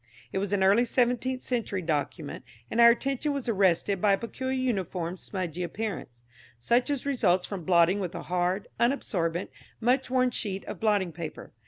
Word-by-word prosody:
It 190 Hz, -, 0 dB
was 200 Hz, 0 st, -2 dB
an 200 Hz, -2 st, +2 dB
early 200 Hz, +5 st, +5 dB
seventeenth 250 Hz, +1 st, 0 dB
century 215 Hz, -7 st, -2 dB
document, 150 Hz, -1 st, -3 dB, 0.3 s
and 235 Hz, -, +3 dB
our 235 Hz, -, +10 dB
attention 275 Hz, +4 st, 0 dB
was 280 Hz, -3 st, -4 dB
arrested 195 Hz, -2 st, +2 dB
by 205 Hz, -2 st, +4 dB
a -, -, +3 dB
peculiar 260 Hz, +4 st, -4 dB
uniform 190 Hz, -8 st, -2 dB
smudgy 180 Hz, -3 st, -4 dB
appearance, 175 Hz, -, -5 dB, 0.4 s
such 240 Hz, -, +2 dB
as 280 Hz, -2 st, -2 dB
results 190 Hz, -10 st, +2 dB
from 190 Hz, -5 st, -6 dB
blotting 175 Hz, +2 st, +4 dB
with 180 Hz, -4 st, -4 dB
a -, -, -5 dB
hard, 180 Hz, +2 st, -1 dB
unabsorbent, 185 Hz, -9 st, 0 dB, 0.3 s
much 250 Hz, +3 st, +1 dB
worn 255 Hz, -1 st, +2 dB
sheet 200 Hz, -5 st, -3 dB
of -, -, -7 dB
blotting 205 Hz, -5 st, +1 dB
paper. 160 Hz, 0 st, -7 dB
200 Hz, 170 wpm, -28 LUFS, 180-245 Hz, 0.4 s, our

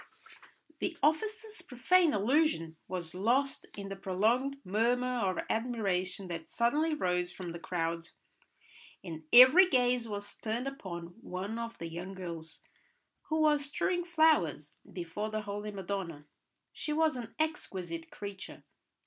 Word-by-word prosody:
The 340 Hz, -2 st, -2 dB
officer's 430 Hz, +6 st, 0 dB
profane 335 Hz, +4 st, +3 dB
allusion 210 Hz, -, +2 dB
was 175 Hz, -3 st, -4 dB
lost 250 Hz, +9 st, +1 dB
in 200 Hz, -1 st, -5 dB
the 195 Hz, -, -5 dB
prolonged 220 Hz, +9 st, +1 dB
murmur 230 Hz, +6 st, +2 dB, 0.2 s
of 185 Hz, -, -2 dB
admiration 200 Hz, -5 st, -1 dB
that 165 Hz, -1 st, -6 dB
suddenly 300 Hz, +7 st, +2 dB
rose 180 Hz, -7 st, 0 dB
from 180 Hz, -1 st, -6 dB
the 170 Hz, -, -7 dB
crowd, 165 Hz, -1 st, -2 dB, 1.0 s
and 160 Hz, -4 st, -7 dB
every 260 Hz, +10 st, +9 dB
gaze 250 Hz, -3 st, +2 dB
was 205 Hz, -1 st, -4 dB
turned 230 Hz, +4 st, -2 dB
upon 175 Hz, -10 st, -6 dB
one 200 Hz, +4 st, -4 dB
of 230 Hz, 0 st, -5 dB
the 170 Hz, -, -5 dB
young 175 Hz, +4 st, -6 dB
girls 170 Hz, -3 st, -7 dB, 0.7 s
who 315 Hz, 0 st, +1 dB
was 295 Hz, -2 st, +4 dB
strewing 350 Hz, +5 st, 0 dB
flowers 310 Hz, -, +2 dB
before 180 Hz, +4 st, -4 dB
the 215 Hz, 0 st, -2 dB
holy 205 Hz, 0 st, -5 dB
Madonna. 190 Hz, -6 st, -4 dB, 0.5 s
She 300 Hz, -, -3 dB
was 315 Hz, -2 st, +3 dB
an 235 Hz, -2 st, -7 dB
exquisite 185 Hz, -, -3 dB
creature. 200 Hz, -1 st, -8 dB
210 Hz, 130 wpm, -32 LUFS, 180-275 Hz, 1.0 s, every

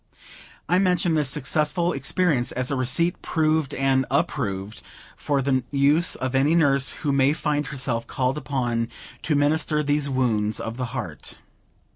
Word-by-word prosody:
I 180 Hz, +3 st, +3 dB
mention 180 Hz, -3 st, +2 dB
this 150 Hz, -3 st, +1 dB
successful 150 Hz, +6 st, 0 dB
experience 140 Hz, -1 st, +1 dB
as 130 Hz, +1 st, -2 dB
a -, -, 0 dB
receipt 135 Hz, +8 st, +1 dB
proved 155 Hz, -3 st, 0 dB
and 135 Hz, -1 st, +1 dB
approved, 100 Hz, +2 st, -2 dB, 0.3 s
for 140 Hz, -2 st, -1 dB
the 130 Hz, -1 st, +1 dB
use 145 Hz, +4 st, +2 dB
of 130 Hz, 0 st, -4 dB
any 140 Hz, +5 st, +3 dB
nurse 140 Hz, -5 st, +3 dB, 0.2 s
who 145 Hz, -, +2 dB
may 140 Hz, +1 st, +3 dB
find 150 Hz, -2 st, -1 dB
herself 130 Hz, -4 st, -2 dB
called 130 Hz, +1 st, -1 dB
upon 120 Hz, -5 st, -2 dB, 0.3 s
to 155 Hz, -, 0 dB
minister 150 Hz, +1 st, +2 dB
to -, -, -3 dB
these 145 Hz, 0 st, 0 dB
wounds 110 Hz, -5 st, 0 dB
of 115 Hz, +1 st, -5 dB
the 130 Hz, -, -2 dB
heart. 85 Hz, -12 st, -6 dB
140 Hz, 155 wpm, -24 LUFS, 130-150 Hz, 0.3 s, I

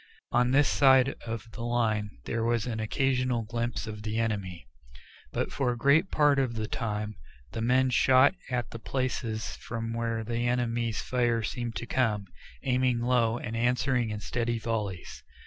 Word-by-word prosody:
On 125 Hz, 0 st, +3 dB
this 140 Hz, +2 st, +4 dB
side 130 Hz, -1 st, +5 dB
of 115 Hz, +1 st, -4 dB
the 115 Hz, -, -8 dB
line 115 Hz, -3 st, 0 dB, 0.2 s
there 115 Hz, -1 st, -1 dB
was 115 Hz, -1 st, +1 dB
an 115 Hz, -3 st, -3 dB
occasional 125 Hz, +1 st, 0 dB
glimpse 115 Hz, +1 st, -3 dB
of 105 Hz, -1 st, -7 dB
the 110 Hz, +1 st, -3 dB
enemy. 100 Hz, -, -2 dB, 0.7 s
But -, -, -2 dB
for 130 Hz, -3 st, 0 dB
a 120 Hz, -, -4 dB
great 140 Hz, +9 st, +4 dB
part 145 Hz, -2 st, +3 dB
of 125 Hz, -3 st, 0 dB
the 110 Hz, -1 st, -2 dB
time 105 Hz, -2 st, -3 dB, 0.3 s
the 115 Hz, -, -4 dB
men 130 Hz, +2 st, +3 dB
shot 130 Hz, +3 st, +5 dB, 0.2 s
at 120 Hz, -3 st, -2 dB
the 115 Hz, -, -7 dB
places 120 Hz, -3 st, -2 dB
from 115 Hz, 0 st, -5 dB
where 115 Hz, -1 st, -2 dB
the 120 Hz, +2 st, -1 dB
enemy's 120 Hz, -2 st, 0 dB
fire 120 Hz, -2 st, +1 dB
seemed 120 Hz, +1 st, -3 dB
to -, -, -4 dB
come, 110 Hz, -6 st, 0 dB, 0.4 s
aiming 125 Hz, -2 st, +1 dB
low 120 Hz, -2 st, +2 dB
and 115 Hz, -1 st, -5 dB
answering 125 Hz, 0 st, +1 dB
in 105 Hz, -1 st, -4 dB
steady 120 Hz, +1 st, -1 dB
volleys. 105 Hz, -5 st, -4 dB
120 Hz, 165 wpm, -28 LUFS, 110-125 Hz, 0.7 s, side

